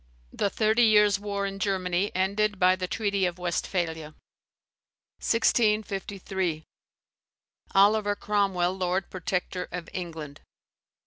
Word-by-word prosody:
The 200 - 0
Thirty 220 +3 +2
Years' 210 -3 +5
War 200 -1 -3
in 195 0 -5
Germany 190 -1 0
ended 200 +2 +1
by 185 0 +4
the 185 -1 -4
treaty 200 -2 0
of 175 0 -5
Westphalia. 170 -3 -3 1.0
1653. 200 -6 0 1.1
Oliver 205 +1 +4
Cromwell 195 -4 0
lord 185 0 -1
protector 180 0 -3
of 175 -1 -6
England. 160 -5 -6
190 Hz, 105 wpm, -27 LUFS, 180-205 Hz, 1.1 s, Years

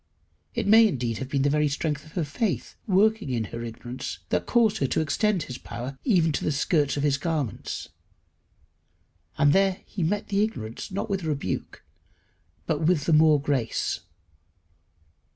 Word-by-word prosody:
It - - -1
may 220 +2 +7
indeed 120 - -2
have 130 - -5
been 135 -1 +1
the 145 - +3
very 150 0 +2
strength 145 +1 -2
of 155 - -16
her 175 - 0
faith 155 - -2
working 210 -1 +3
in 120 -3 0
her 115 0 -4
ignorance 120 +2 -6
that - - 0
caused 225 -3 +3
her 135 - +1
to - - 0
extend 175 +4 +1
his 125 -4 -7
power 130 +3 -6
even 175 - +3
to 140 - -2
the - - +1
skirts 145 0 +1
of 140 - -1
his 140 -2 +2
garments. 150 - -3 1.5
And 145 -1 +4
there 195 -1 +2
he 200 - -6
met 200 +6 -1
the 200 +1 +2
ignorance, 115 - -4
not 195 - -3
with 195 -2 -2
rebuke, 145 - -3 0.8
but 155 -1 -1
with 160 -3 +2
the 165 - +2
more 155 -1 +6
grace. 135 -5 -1
150 Hz, 170 wpm, -26 LUFS, 135-190 Hz, 1.5 s, may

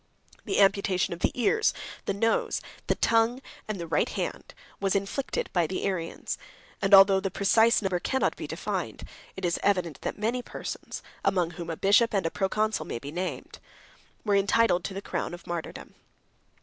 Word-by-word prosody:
The - - 0
amputation 195 -2 +3
of 170 - -8
the - - +2
ears 435 - +2 0.3
the - - 0
nose, 225 +3 +1 0.3
the - - +2
tongue, 230 +2 +2 0.3
and 215 -3 -3
the 170 - -4
right 165 - +1
hand, - - -4 0.2
was 195 -1 +1
inflicted 200 +8 -1
by 175 -3 +2
the 185 - -3
Arians; 180 -4 -3 0.4
and 195 0 0
although 195 0 +8
the 195 0 -2
precise 225 +4 +3
number 185 -2 0
cannot 265 +8 0
be - - -6
defined, - - -4 0.3
it 190 - -4
is 170 - 0
evident 180 -7 0
that - - -3
many 230 +4 -1
persons, - - -7 0.2
among 175 -3 +1
whom 170 0 -7
a 165 - -3
bishop 210 +4 +4
103 - - +3
and 190 - -1
a 165 - 0
proconsul 215 +3 0
104 - - -13
may - - -3
be 140 +5 -7
named, 180 +3 -5 0.7
were 205 -2 +3
entitled 200 -2 +3
to 195 - -4
the 195 - -5
crown 175 - -3
of 175 - -15
martyrdom. 170 -2 -6
195 Hz, 185 wpm, -27 LUFS, 175-215 Hz, 0.7 s, although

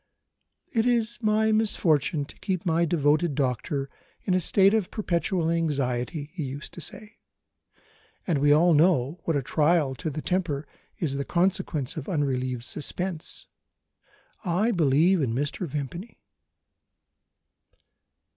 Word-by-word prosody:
"It 225 0 +2
is 235 -1 +1
my 220 0 +2
misfortune 165 - +2
to - - -15
keep 185 -2 -2
my 170 0 +2
devoted 155 -1 +2
doctor 135 +1 -1 0.4
in 185 - 0
a 185 - +3
state 195 +3 +4
of 215 -5 +1
perpetual 175 -4 -1
anxiety," 145 -2 -1
he 185 - -5
used 140 +1 -6
to 175 - -8
say; 210 +7 -9 1.1
"and 165 -6 +1
we 145 +1 +4
all 165 +4 +5
know 155 -1 +3
what 165 - 0
a 140 - -2
trial 150 0 +2
to 140 - -3
the 155 +1 -5
temper 170 -6 -1 0.3
is 140 -5 -2
the 140 - -1
consequence 175 -5 -1
of 150 - -5
unrelieved 130 -6 -1
suspense. 170 +6 -4 1.0
I 195 +5 +1
believe 165 - +3
in 120 -5 -1
Mr. 145 +6 -2
Vimpany." 150 - -6
160 Hz, 130 wpm, -26 LUFS, 140-185 Hz, 1.1 s, all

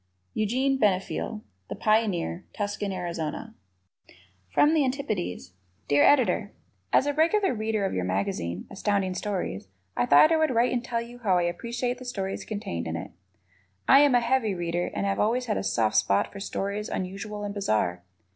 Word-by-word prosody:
Eugene 260 +5 +1
Benefiel, 210 +1 0 0.3
The - - -4
Pioneer, 205 -5 0
Tucson, 205 -1 -2
Arizona. 175 +3 -4 1.0
From 300 +2 +4
the 310 -3 +3
Antipodes 215 - -3 0.3
Dear 145 0 +4
Editor: 275 -5 +3 0.4
As - - +4
a 290 - 0
regular 360 +6 +2
Reader 215 -2 -1
of 190 - -2
your 90 - -1
magazine, 90 -2 -2
Astounding 200 -2 0
Stories, 185 - -3 0.3
I 120 - +1
thought 145 - +7
I 325 - +4
would 315 0 +2
write 235 +2 +3
and 245 -1 -1
tell 235 -2 -2
you 240 +1 -12
how 195 -6 +2
I 175 - +2
appreciate 235 +8 -2
the 255 - -9
stories 195 -6 -4
contained 85 - -4
in 80 - -3
it. 85 - -6 0.8
I 275 - +8
am 285 -3 +5
a 245 - +4
heavy 235 -4 +1
Reader 175 0 -2
and - - -1
have 195 0 0
always 240 +4 +1
had 215 -3 -1
a - - -2
soft 115 - +1
spot 100 - +2
for 200 - -7
stories 200 +1 -3
unusual 200 +3 -4
and 205 0 -4
bizarre. 110 - 0
205 Hz, 175 wpm, -27 LUFS, 175-245 Hz, 1.0 s, I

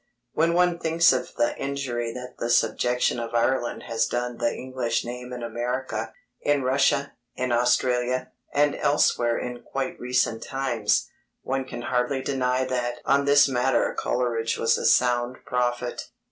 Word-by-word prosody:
When 165 +1 +2
one 180 -1 +3
thinks 165 +1 +4
of - - -3
the 295 0 +1
injury 130 -4 -2
that 125 +1 -8
the 115 - -2
subjection 125 0 +2
of 115 0 -5
Ireland 120 +1 0
has 115 -1 0
done 120 0 -3
the 120 -1 +1
English 125 -3 -2
name 125 +1 -7
in 125 -1 -6
America, 120 -1 -3 0.3
in 145 -2 +1
Russia, 140 +2 +2 0.2
in 125 -1 -2
Australia, 125 +1 +1 0.2
and 145 0 +3
elsewhere 120 -5 +2
in 125 -1 -5
quite 135 -1 -4
recent 125 -2 0
times, 125 -6 0 0.4
one 135 0 -2
can 120 -2 -7
hardly 125 +2 0
deny 130 -1 0
that 120 -1 -2
on 140 0 +3
this 145 0 +6
matter 130 0 +1
Coleridge 115 -2 -1
was 115 0 +3
a - - 0
sound 125 0 +2
prophet. 120 0 -2
125 Hz, 150 wpm, -25 LUFS, 120-135 Hz, 0.4 s, this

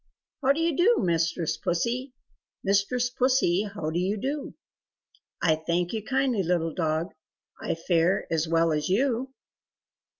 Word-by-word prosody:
How 270 0 +4
do 285 - 0
you 330 -2 +1
do 430 - +4
mistress 165 -1 0
Pussy? 240 +10 -1 0.5
Mistress 205 +5 +1
Pussy, 245 -7 +2
how 165 -6 -4
do 170 - -1
you 195 +4 0
do?" 275 +6 -4 0.9
"I 160 -3 +4
thank 170 +4 -1
you 220 -2 -3
kindly, 265 -3 +1
little 165 -2 0
dog, 160 +1 -1 0.5
I - - -1
fare 170 +2 +1
as 160 0 +1
well 165 0 +2
as 150 +1 -1
you!" 255 +5 +1
195 Hz, 140 wpm, -26 LUFS, 165-255 Hz, 0.9 s, How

